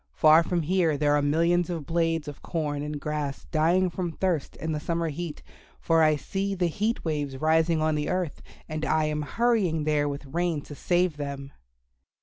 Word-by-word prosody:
Far 155 +1 +7
from 170 0 -1
here 165 -2 +2
there 145 0 +3
are 145 - +2
millions 170 +4 +2
of 165 -4 -4
blades 165 0 0
of 145 - -8
corn 150 -3 -2
and 150 0 -4
grass 150 -2 -3
dying 175 +3 +2
from 170 0 -3
thirst 175 -4 -1
in 160 +1 -4
the 155 - -1
summer 165 +1 -1
heat, 155 0 -6 0.4
for 165 -1 +3
I 155 -1 +5
see 195 +6 -3
the 180 -1 0
heat 210 +7 -1
waves 145 -4 -2
rising 160 +2 +2
on 155 0 +2
the 150 0 -1
earth, 180 -5 -2 0.3
and 155 -1 -4
I 155 0 +2
am 150 0 -1
hurrying 190 -2 +1
there 150 -1 +1
with 140 +1 -6
rain 165 +1 -1
to 145 - -10
save 175 +1 +1
them." 140 -1 -5
160 Hz, 190 wpm, -27 LUFS, 150-175 Hz, 0.4 s, Far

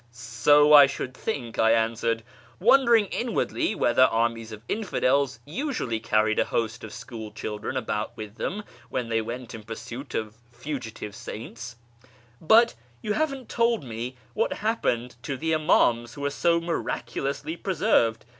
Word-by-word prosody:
" 120 - -33
So 120 +6 +4
I 145 -2 +10
should 130 -1 -5
think," 130 - -4
I 110 0 +5
answered, 115 0 0 0.4
wondering 235 0 +5
inwardly 240 -1 -1
whether - - +2
armies 115 0 0
of 110 0 -9
infidels 140 - +1
usually 165 - -2
carried 110 -1 +1
a - - +3
host 115 0 -2
of 110 - -7
school 115 -1 -8
children 105 +4 -5
about 110 -3 -3
with 110 0 -8
them 210 +3 -3 0.3
when 125 -3 -3
they 115 0 +1
went 120 +2 -6
in 110 - -7
pursuit 115 +5 -8
of 110 -1 -3 0.2
fugitive 120 -5 -6
saints; 115 +1 -8 0.3
" - - -28 0.3
but 225 +8 +5 0.3
you 210 - 0
haven't 275 -2 -2
told 230 -4 +1
me 120 +1 -5 0.2
what 225 - 0
happened 125 - 0
to 135 +3 -4
the 160 +3 -1
Imams 120 -7 +2
who 145 - -8
were 145 0 -1
so 170 +3 +2
miraculously 160 -3 -3
preserved. 175 - +1
125 Hz, 155 wpm, -26 LUFS, 115-165 Hz, 0.4 s, I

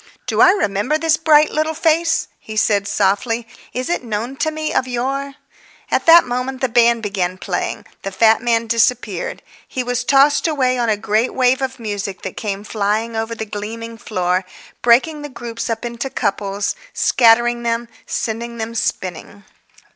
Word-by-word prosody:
"Do - - +1
I - - +8
remember 255 - +1
this 320 0 +2
bright 310 -1 +4
little 310 +1 -1
face?" 325 +1 +2
he 215 0 -8
said 205 -2 +2
softly. 205 +4 0 0.2
"Is 255 0 -3
it 345 - -1
known 230 +3 -4
to 315 - 0
me 310 0 -3
of 260 - +1
yore?" 270 +3 -3 0.6
At - - 0
that 335 +1 +8
moment 250 +2 -3
the 260 - 0
band 235 -1 +3
began 185 -3 -2
playing; - - -3 0.2
the 195 - -5
fat 220 +4 +4
man 230 -1 +1
disappeared. 230 -4 0 0.2
He 255 - -3
was 245 0 -1
tossed 280 +4 +4
away 260 -5 +1
on 235 -1 +1
a 215 - +2
great 215 +3 0
wave 255 0 +3
of 265 -1 -3
music 205 -4 -5
that - - -5
came 200 -2 -4
flying 215 +2 -1
over 225 +1 -2
the 220 - -5
gleaming 225 +2 -6
floor, 185 -4 -1 0.4
breaking 265 +6 +3
the 295 - -6
groups 235 -2 -6
up 225 +1 -3
into 235 +3 -4
couples, 200 -3 -1 0.2
scattering 240 0 +4
them, 235 0 -1 0.2
sending 235 +1 -3
them 225 0 -4
spinning.... 200 -2 -4
235 Hz, 170 wpm, -19 LUFS, 215-260 Hz, 0.6 s, I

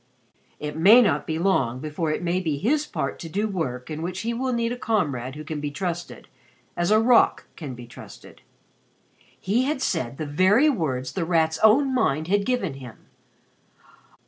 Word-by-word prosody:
"It 150 0 -5
may 195 +9 +7
not 175 -12 +2
be 160 - -2
long 135 -9 +1
before 155 +2 -3
it 155 - -2
may 175 +1 0
be 160 -6 -2
his 290 - 0
part - - -4
to 165 - -7
do 205 +6 -1
work 145 -9 -4
in 155 +1 -5
which 180 +2 -4
he 230 +1 -2
will 255 +2 -2
need 235 -1 -1
a - - -2
comrade 145 - -2
who 155 - -7
can 155 0 -5
be 145 - -2
trusted 175 +3 -5 0.5
as 175 0 0
a 215 +1 +5
rock 235 +1 +4
can 140 -6 -7
be 120 0 -10
trusted." 120 - -13 1.0
He 230 +7 +1
had 290 0 -1
said 160 - -2
the 155 - -4
very 190 - +4
words 130 - -3
The 185 - -2
Rat's 160 -2 +1
own 260 +5 +4
mind 155 - 0
had 200 +1 +2
given 245 - -1
to 135 - -11
him. 125 -4 -13
175 Hz, 190 wpm, -24 LUFS, 150-220 Hz, 1.0 s, may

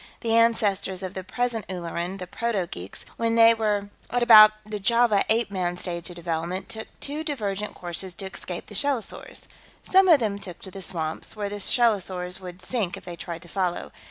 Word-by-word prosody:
The 230 -1 0
ancestors 205 -5 +2
of 185 0 -4
the 190 - -5
present 230 +3 -2
Ulleran, 175 0 -4
the 185 - -6
proto 210 0 -1
geeks, 90 - -7
when 230 0 +1
they 230 0 +8
were 210 -2 -1 0.2
at 245 +1 +1
about 215 -2 +10
the 215 -1 -5
Java 230 0 +3
Ape 225 -1 +2
Man 180 -2 -1
stage 170 -1 -4
of 175 - -9
development, 170 +2 -3
took 220 0 -4
two 295 +2 -4
divergent 210 -9 -3
courses 175 +1 -5
to 195 - -5
escape 185 -2 -6
the - - -12
shellosaurs. 270 +1 -2 0.4
Some 380 0 +5
of 325 -5 +7
them 205 -4 -1
took 185 -4 -7
to 190 - -6
the 195 - -8
swamps, 160 0 -3
where 205 -1 -3
the 205 0 -5
shellosaurs 190 -5 +1
would 180 -1 -9
sink 205 -4 -1
if - - -13
they 175 - -6
tried 170 0 -7
to - - -12
follow. 180 -1 -2
195 Hz, 195 wpm, -25 LUFS, 180-225 Hz, 0.4 s, about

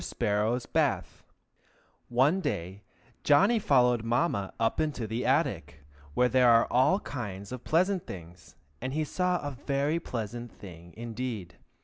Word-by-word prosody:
SPARROW'S 110 +4 0
BATH - - -1 0.9
One 135 +9 +3
day 95 - -3 0.4
Johnny 195 +11 +5
followed 125 - +3
Mamma 115 - 0
up 115 0 +1
into 150 -7 -1
the 115 +3 -2
attic, 75 - 0 0.3
where 125 - +4
there 125 -1 +4
are 115 0 +6
all 130 +11 +4
kinds 100 -7 -6
of 125 -1 -6
pleasant 185 +3 +1
things, 85 -1 -11 0.3
and 130 +2 -3
he 155 +1 0
saw 180 +4 0
a - - -3
very 140 +4 -1
pleasant 120 -4 -5
thing 85 -2 -13
indeed. 115 -5 -5
120 Hz, 135 wpm, -29 LUFS, 105-145 Hz, 0.9 s, are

